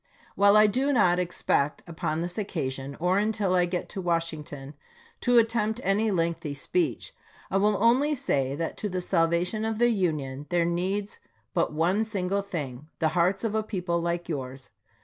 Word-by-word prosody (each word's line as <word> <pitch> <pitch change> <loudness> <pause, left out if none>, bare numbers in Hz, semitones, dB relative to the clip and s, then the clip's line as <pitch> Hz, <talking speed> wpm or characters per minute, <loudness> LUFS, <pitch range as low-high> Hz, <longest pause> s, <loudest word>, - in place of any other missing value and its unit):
While 200 +1 +5
I 215 - +7
do 260 +7 +1
not 180 -9 +3
expect, 170 -4 0
upon 160 -1 -3
this 175 +3 -3
occasion, 140 -8 -4
or 180 +3 +2
until 210 -3 0
I 180 -1 +4
get 175 0 -3
to 195 - -5
Wash 170 -1 0
ington, 145 -3 -8 0.5
to 245 -1 +3
attempt 225 -1 +2
any 210 +3 +2
lengthy 165 -5 -1
speech, 345 - -1 0.4
I - - +2
will 205 +1 +3
only 260 +7 +3
say 140 - 0
that 165 +2 -4
to 210 - -3
the 185 -1 -2
salvation 175 +4 +1
of 220 -1 -1
the 240 +1 +4
Union 150 - -1
there 175 -1 +2
needs 190 +4 -2 0.3
but - - +1
one 175 +7 +1
single 200 -2 -1
thing, 150 -8 -6
the 160 - +2
hearts 180 +5 +1
of 225 -2 -1
a 220 - +1
people 180 -5 -2
like 170 0 -2
yours. 135 -4 -6
180 Hz, 175 wpm, -27 LUFS, 165-210 Hz, 0.5 s, I